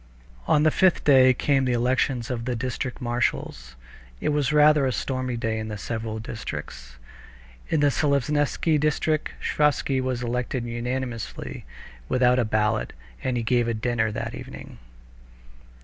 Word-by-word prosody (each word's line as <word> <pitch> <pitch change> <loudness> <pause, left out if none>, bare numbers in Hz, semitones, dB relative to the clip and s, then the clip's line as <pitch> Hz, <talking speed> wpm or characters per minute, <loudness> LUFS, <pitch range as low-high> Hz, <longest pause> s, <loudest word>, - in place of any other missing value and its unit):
On 150 - +4
the 155 - +4
fifth 185 +1 +3
day 130 -3 +6
came 135 +1 +1
the 125 - +1
elections 125 0 0
of 115 -2 -3
the 125 -1 -1
district 130 +2 -4
marshals. 120 - -2 0.4
It - - -1
was 145 -2 +1
rather 150 -2 +5
a - - 0
stormy 130 +2 -2
day 115 -1 -2
in 110 -1 -5
several 110 0 -4
districts. 65 - -7 0.7
In 155 - +1
the 145 -1 +4
Seleznevsky 145 +2 +1
district 155 +1 0
Sviazhsky 145 -2 +1
was 130 -1 -2
elected 125 +1 -2
unanimously 120 0 -4 0.4
without 125 0 +3
a 120 - +2
ballot, 105 0 0 0.3
and 125 -1 0
he 115 - -1
gave 120 0 +2
a 115 - 0
dinner 110 -1 0
that - - -4
evening. - - -10
125 Hz, 145 wpm, -25 LUFS, 115-140 Hz, 0.7 s, day